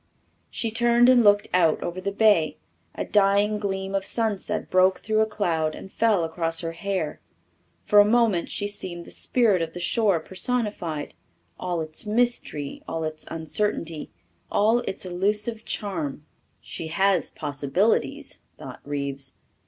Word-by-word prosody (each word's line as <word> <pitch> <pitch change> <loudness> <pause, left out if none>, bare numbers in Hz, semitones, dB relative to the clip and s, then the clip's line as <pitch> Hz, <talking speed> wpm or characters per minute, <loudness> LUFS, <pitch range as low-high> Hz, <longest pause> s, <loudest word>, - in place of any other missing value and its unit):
She 225 - -3
turned 240 +2 +4
and 250 -2 +6
looked 205 -1 +5
out 170 -3 +3
over 175 +2 -4
the 200 +1 -2
bay. 195 -8 +3 0.4
A - - -3
dying 205 +1 +3
gleam 195 -1 -3
of 195 -1 0
sunset 220 -2 -1
broke 185 +1 +4
through 215 0 0
a 220 - +3
cloud 165 -7 -1
and 190 - -10
fell 220 -6 +2
across 165 0 0
her 165 -1 -3
hair. 170 -2 -3 0.6
For 210 - +6
a - - +10
moment 215 -4 +2
she 205 - -2
seemed 180 -4 -6
the - - -12
spirit 220 -8 +2
of 165 0 -3
the 175 - -6
shore 190 +1 +2
personified 190 -5 -3 0.5
all 175 -2 -2
its 155 +6 -8
mystery, 215 -10 -1
all 165 - -3
its 155 0 -5
uncertainty, 165 -1 -2 0.4
all 220 +4 +3
its 190 - -4
elusive 210 +5 -1
charm. 155 -8 -3 0.4
She 160 - -6
has 190 +3 +2
possibilities, 145 +10 -1 0.2
thought - - -9
Reeves. 140 -2 -4
190 Hz, 145 wpm, -25 LUFS, 165-210 Hz, 0.6 s, a